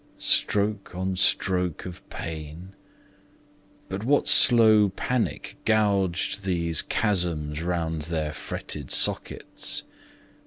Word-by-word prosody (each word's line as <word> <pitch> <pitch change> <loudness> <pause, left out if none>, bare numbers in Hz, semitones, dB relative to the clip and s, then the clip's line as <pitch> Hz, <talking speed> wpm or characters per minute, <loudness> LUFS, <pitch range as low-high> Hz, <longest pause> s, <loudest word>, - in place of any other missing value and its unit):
Stroke 100 -2 +1
on 95 +1 -3
stroke 90 -2 0
of 90 -1 -9
pain, 80 +3 -8 1.1
but 95 +2 -6
what 140 +5 +1
slow 110 -4 +6
panic, 120 +5 -3
Gouged 100 -3 0
these 85 -4 +1
chasms 85 -7 -1
round 85 -2 -3
their 80 -3 -3
fretted 75 -2 -6
sockets? - - -1
90 Hz, 90 wpm, -25 LUFS, 80-100 Hz, 1.1 s, slow